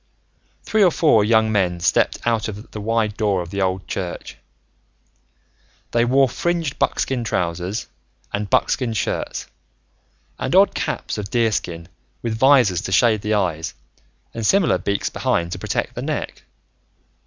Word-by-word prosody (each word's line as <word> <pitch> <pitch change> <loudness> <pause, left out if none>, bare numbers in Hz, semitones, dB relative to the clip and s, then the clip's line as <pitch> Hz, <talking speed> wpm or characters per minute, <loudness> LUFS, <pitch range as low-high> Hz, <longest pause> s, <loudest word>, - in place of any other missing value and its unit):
Three 215 -1 +2
or 185 - +6
four 150 -10 +3
young 110 0 +3
men 90 -4 +1
stepped - - +2
out 115 -2 +1
of 105 +1 -8
the 105 - -6
wide 110 -1 0
door 100 -5 +1
of 85 - -11
the 100 - -2
old 95 0 -1
church. 90 -3 -5 1.6
They 120 0 +2
wore 135 +2 +4
fringed 165 +2 -2
buckskin 130 -3 0
trousers 90 0 -2 0.5
and 100 0 -2
buckskin 120 -4 +1
shirts 100 -3 -2 0.9
and - - -1
odd - - +6
caps - - -3
of 100 -1 -5
deerskin 100 -8 -1 0.4
with 115 -2 -1
visors 120 -8 +4
to 95 - -5
shade 110 +2 +3
the 105 +1 0
eyes 85 -6 -1 0.6
and 115 - -5
similar 175 - +3
beaks 100 +2 -2
behind 85 0 -1
to - - -4
protect - - -2
the - - -5
neck. - - -4
105 Hz, 145 wpm, -21 LUFS, 95-120 Hz, 1.6 s, or